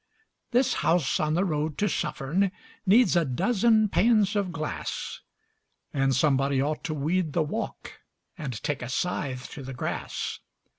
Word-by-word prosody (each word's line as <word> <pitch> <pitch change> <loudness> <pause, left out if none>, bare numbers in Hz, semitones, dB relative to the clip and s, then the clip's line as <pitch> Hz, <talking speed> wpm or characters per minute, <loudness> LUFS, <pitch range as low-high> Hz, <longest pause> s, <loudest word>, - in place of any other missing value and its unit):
This 250 +1 +3
house 165 -5 +2
on 155 0 +1
the 185 +3 +2
road 155 -3 -1
to 210 - +2
Suffern 165 +3 0 0.4
needs 225 +2 +5
a 170 - +4
dozen 215 - +3
panes 215 0 +3
of 200 -3 0
glass, 155 -2 -4 0.7
And 135 -1 +2
somebody 135 0 +2
ought 150 +3 -1
to 155 - -2
weed 155 +2 0
the 165 - +2
walk 215 +10 -5 0.4
and 150 -7 -4
take 145 -3 -1
a 125 - -5
scythe 130 -4 -2
to 145 - -7
the 135 -1 -7
grass. - - -3
155 Hz, 150 wpm, -27 LUFS, 140-200 Hz, 0.7 s, needs